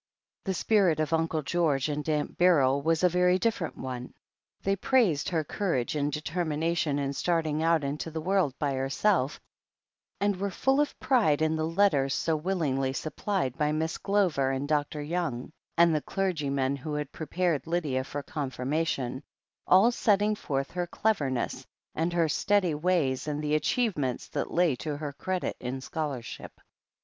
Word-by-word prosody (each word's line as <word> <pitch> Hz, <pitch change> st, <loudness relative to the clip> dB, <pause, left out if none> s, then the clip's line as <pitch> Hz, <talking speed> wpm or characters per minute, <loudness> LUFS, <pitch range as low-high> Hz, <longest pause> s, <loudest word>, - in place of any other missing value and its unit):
The 190 Hz, -2 st, -1 dB
spirit 190 Hz, -6 st, +3 dB
of 155 Hz, 0 st, 0 dB
Uncle 160 Hz, -1 st, 0 dB
George 150 Hz, -4 st, +1 dB
and 150 Hz, +1 st, -3 dB
Aunt 150 Hz, -1 st, -1 dB
Beryl 140 Hz, -6 st, +4 dB
was 165 Hz, +3 st, +1 dB
a 180 Hz, -, +6 dB
^ery 180 Hz, +1 st, +3 dB
different 195 Hz, -5 st, -1 dB
one. 125 Hz, -1 st, -6 dB, 0.5 s
They 195 Hz, 0 st, +2 dB
praised 200 Hz, -, +2 dB
her 165 Hz, -3 st, 0 dB
courage 155 Hz, -, -1 dB
and 145 Hz, 0 st, 0 dB
de 150 Hz, -, -3 dB
termination 160 Hz, -2 st, -1 dB
in 140 Hz, -1 st, -1 dB
starting 160 Hz, -1 st, 0 dB
out 165 Hz, -2 st, +3 dB
into 145 Hz, +3 st, -3 dB
the 160 Hz, 0 st, -4 dB
world 180 Hz, -5 st, +1 dB
^jr 140 Hz, -2 st, 0 dB
herself, 135 Hz, +2 st, +1 dB, 0.8 s
and 200 Hz, +1 st, +1 dB
were 200 Hz, +2 st, -1 dB
full 270 Hz, +9 st, +2 dB
of 295 Hz, -, -2 dB
pride 160 Hz, -, +3 dB
in 160 Hz, 0 st, +2 dB
the 155 Hz, 0 st, -1 dB
letters 165 Hz, -7 st, +2 dB
so 160 Hz, -, 0 dB
willingly 150 Hz, -6 st, -1 dB
sup 155 Hz, +3 st, -5 dB
plied 185 Hz, -, -1 dB
by 150 Hz, 0 st, +2 dB
Miss 160 Hz, +1 st, -2 dB
Glover 185 Hz, -10 st, +1 dB
and 135 Hz, +1 st, -2 dB
Dr. 150 Hz, 0 st, -1 dB
Young, 150 Hz, -6 st, -3 dB, 0.3 s
and 170 Hz, -1 st, +6 dB
the 155 Hz, -, +1 dB
f^rgy 175 Hz, -8 st, -1 dB
man 135 Hz, 0 st, 0 dB
who 150 Hz, +3 st, -5 dB
had 150 Hz, -1 st, -3 dB
prepared 165 Hz, -1 st, -1 dB
Lydia 155 Hz, -6 st, 0 dB
for 140 Hz, +2 st, -5 dB
confirmation, 135 Hz, -2 st, -2 dB, 0.5 s
all 195 Hz, +6 st, +6 dB
setting 210 Hz, -2 st, +2 dB
forth 135 Hz, -9 st, -3 dB
her 175 Hz, 0 st, -2 dB
cleverness, 145 Hz, -, -1 dB, 0.3 s
and 165 Hz, +2 st, 0 dB
her 170 Hz, -2 st, +2 dB
steady 185 Hz, +2 st, +2 dB
ways 150 Hz, -4 st, 0 dB
and 150 Hz, -1 st, -2 dB
the 150 Hz, 0 st, 0 dB
achievements 155 Hz, -, 0 dB
that -, -, -3 dB
lay 170 Hz, -5 st, +2 dB
to 150 Hz, +2 st, -4 dB
her 145 Hz, -1 st, -5 dB
credit 185 Hz, +5 st, -3 dB
in 125 Hz, +2 st, -4 dB
scholarship. 140 Hz, -3 st, -5 dB
155 Hz, 165 wpm, -28 LUFS, 140-180 Hz, 0.8 s, a